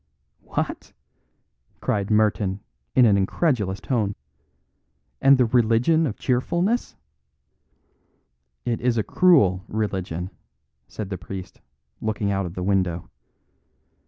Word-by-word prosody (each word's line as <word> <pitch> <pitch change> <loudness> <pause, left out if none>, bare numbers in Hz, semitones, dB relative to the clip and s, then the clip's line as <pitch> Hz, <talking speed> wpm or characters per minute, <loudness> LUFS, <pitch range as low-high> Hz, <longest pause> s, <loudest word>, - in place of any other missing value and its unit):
"What?" - - -4 0.9
cried 100 -1 -1
Merton 105 -2 +1 0.3
in 125 - +7
an 105 -3 +5
incredulous 100 - 0
tone. 105 -6 -1 1.1
"And 135 0 +6
the 125 - +4
Religion 120 +7 +3
of 110 - -5
Cheerfulness 175 - 0 0.8
" 60 0 -46
"It 115 - -4
is 120 -1 +1
a 110 - +2
cruel 105 - +4
religion," 95 -4 -3 0.6
said 105 -2 -7
the 95 - -4
priest, 95 0 -8 0.4
looking 105 -2 -1
out 95 -2 -1
of 85 - -9
the 90 - -3
window. 90 -3 0
105 Hz, 110 wpm, -24 LUFS, 95-125 Hz, 1.1 s, in